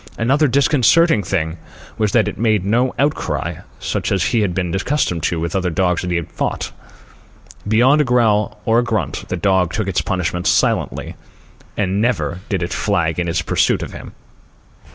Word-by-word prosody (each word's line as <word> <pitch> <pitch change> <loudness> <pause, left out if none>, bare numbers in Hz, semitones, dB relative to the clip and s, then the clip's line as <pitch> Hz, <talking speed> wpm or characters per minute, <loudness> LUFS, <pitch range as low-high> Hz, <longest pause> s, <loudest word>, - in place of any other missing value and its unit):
Another 135 +7 +2
disconcerting 140 +1 +3
thing 85 -3 -2 0.4
was 105 -2 +1
that 115 -3 +3
it - - -3
made 110 -4 +1
no 120 +5 +2
outcry, 145 +2 -1 0.2
such - - -3
as 95 -3 +1
he 120 +2 +1
had 100 -5 0
been 90 -3 -2
accustomed 95 - 0
to 80 +1 -1
with 85 +1 -2
the 95 - 0
other 90 -1 -1
dogs 90 0 0
he 90 -1 -2
had 85 -1 -3
fought. - - -3 1.0
Beyond 125 +8 +4
a - - +3
growl 115 -5 +1
or 115 -1 +3
a - - +1
grunt, 105 - -3
the 90 - -2
dog 95 -1 +2
took 110 0 -2
its 95 - 0
punishment 90 -1 -2
silently. - - 0 0.6
And 100 +1 0
never 115 -6 0
did 95 -4 -1
it 85 - -3
flag 85 -5 0
in 90 - -1
its 85 0 -1
pursuit - - +1
of - - -8
him. - - -10
100 Hz, 180 wpm, -19 LUFS, 90-120 Hz, 1.0 s, Beyond